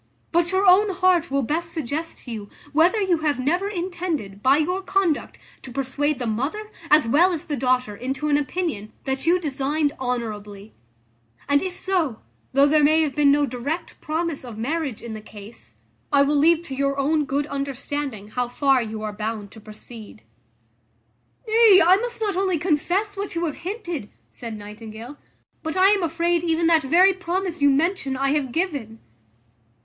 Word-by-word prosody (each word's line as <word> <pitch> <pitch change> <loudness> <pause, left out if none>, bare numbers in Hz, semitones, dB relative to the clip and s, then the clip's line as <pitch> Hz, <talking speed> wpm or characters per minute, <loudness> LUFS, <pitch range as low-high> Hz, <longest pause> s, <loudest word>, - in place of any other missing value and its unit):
But 340 0 +2
your 380 +1 +2
own 390 +3 +6
heart 365 -3 +2
will 275 0 0
best 330 +7 -2
suggest 315 +2 -4
to 245 - -8
you, 210 -3 -6 0.2
whether 345 +8 +4
you 370 -5 +1
have 300 -3 0
never 350 +10 0
intended, 345 - -4
by 265 +4 +4
your 360 +5 0
conduct, 380 -5 0 0.2
to 260 - -10
persuade 275 +3 -1
the 245 - -4
mother, 280 - -3 0.2
as 300 -5 +5
well 335 +10 +4
as 335 -1 -3
the 300 -4 -2
daughter, 255 -4 0
into 265 +6 -3
an 295 - +3
opinion, 290 - -2
that 265 +3 -3
you 355 +2 +4
designed 290 -1 -1
honourably: 215 -5 -5 0.7
and 285 +1 +3
if 370 -1 -4
so, 335 - -1 0.3
though 275 +1 +5
there 300 +1 +4
may 310 +2 +5
have 295 -3 -2
been 290 -2 +4
no 290 0 +3
direct 270 +6 -5
promise 320 -1 -2
of 235 -4 -9
marriage 275 0 -3
in 235 -2 -6
the 215 - -7
case, 210 +1 -13 0.4
I 280 -1 +5
will 290 +1 +1
leave 325 +3 +4
to 270 -5 -6
your 275 +1 0
own 295 +2 +1
good 280 +1 -1
understanding, 275 -5 -4
how 245 +2 -2
far 270 +1 +2
you 220 -1 -5
are 210 -1 -4
bound 210 -1 -4
to 220 - -13
proceed." 215 - -12 1.2
"Nay, 440 -3 +7
I 365 +2 +6
must 475 +2 -4
not 415 -4 -1
only 375 -2 +1
confess 365 +6 0
what 400 -3 -5
you 340 +1 0
have 305 - -4
hinted," 345 - -5 0.2
said 230 -3 -7
Nightingale; 220 +5 -10 0.4
"but 315 +3 -4
I 375 +1 +6
am 405 -1 +3
afraid 340 +1 0
even 330 0 +1
that 330 -1 +5
very 355 +7 +5
promise 365 -2 -3
you 285 - +6
mention 280 -1 0
I 275 +1 +1
have 285 -4 0
given." 280 - -2
295 Hz, 180 wpm, -23 LUFS, 250-345 Hz, 1.2 s, Nay